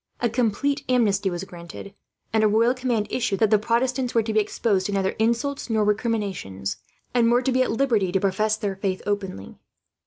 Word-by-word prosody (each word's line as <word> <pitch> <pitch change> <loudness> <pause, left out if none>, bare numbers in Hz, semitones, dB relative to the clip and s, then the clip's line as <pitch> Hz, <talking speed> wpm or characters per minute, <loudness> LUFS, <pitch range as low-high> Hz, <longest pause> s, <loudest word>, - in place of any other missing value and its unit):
A 240 - +1
complete 260 +5 0
amnesty 210 -6 +2
was 175 0 -4
granted, 175 +2 -10 0.4
and 220 -1 +3
a - - +6
royal 225 +4 +3
command 245 -4 -1
issued 230 -6 -1
that 220 -2 +3
the 215 - +5
Protestants 245 +3 0
were 230 - +4
to 220 0 -3
be 215 - +4
exposed 205 -2 0
to - - -3
neither 195 -1 0
insults 235 +5 0
nor 220 -1 +2
recriminations, 200 - -2 0.4
and 235 -1 +3
were 245 +1 +3
to 265 - +1
be 255 0 +2
at 255 - +1
liberty 225 -7 +1
to 190 - +2
profess 210 +3 +1
their 205 -3 -3
faith 190 -1 -3
openly. 195 - -4
215 Hz, 195 wpm, -24 LUFS, 195-240 Hz, 0.4 s, a